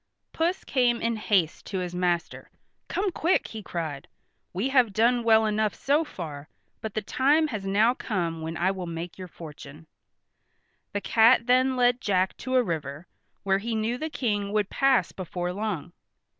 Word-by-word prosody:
Puss 340 +3 0
came 245 -3 +2
in 230 0 0
haste 190 -6 0
to 195 - -3
his 180 -1 -3
master. 180 -1 -1 0.4
"Come 390 0 -1
quick!" 340 +1 +1
he 220 - -7
cried. 160 -7 -5 0.4
"We 200 +9 -1
have 250 -6 +3
done 235 +3 +3
well 220 -1 +5
enough 215 0 0
so 290 +4 +2
far, 155 - -8 0.3
but 220 -2 -5
the 215 - -1
time 295 +8 +2
has 205 -6 -4
now 215 +5 +4
come 170 -10 -3
when 160 +1 -4
I 185 +2 +2
will 185 -2 -5
make 170 +2 -6
your 185 - -6
fortune." 155 -2 -11 1.1
The 205 - -2
cat 230 +2 +5
then 255 +1 +3
led 245 0 +3
Jack 190 -5 +1
to 260 0 -3
a 255 - +5
river, 155 - -4 0.4
where 195 0 +2
he 225 +2 -3
knew 225 +3 -1
the 315 - -3
King 205 -8 -1
would 210 -2 0
pass 270 -2 +3
before 180 -1 -4
long. 190 -5 -4
210 Hz, 170 wpm, -26 LUFS, 175-245 Hz, 1.1 s, well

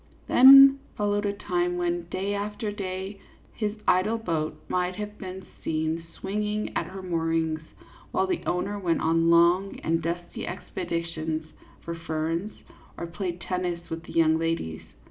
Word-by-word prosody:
Then 275 +1 +9 0.2
followed 205 0 +1
a 200 - 0
time 175 -3 -1
when, 175 -1 -1
day 195 +3 -2
after 205 +1 -3
day, 195 0 -5 0.3
his 210 -1 -2
idle 200 +5 +3
boat 165 -8 -2
might 180 0 0
have 210 +1 -6
been 190 0 -7 0.2
seen 160 +1 -1
swinging 210 +2 -2
at 165 - -1
her 190 +1 -8
moorings, 165 -2 0 0.5
while - - +1
the 365 -2 -1
owner 200 +3 -1
went 170 -4 +1
on 165 +1 +3
long 175 +3 +4
and 165 +1 +1
dusty 170 +1 -4
expeditions 165 -3 -3 0.4
for 170 - -5
ferns, 165 +4 -2 0.4
or - - -4
played 175 0 -4
tennis 175 -1 -3
with 165 0 -3
the - - -10
young 160 -1 +4
ladies. 165 - -2
180 Hz, 145 wpm, -27 LUFS, 165-200 Hz, 0.5 s, Then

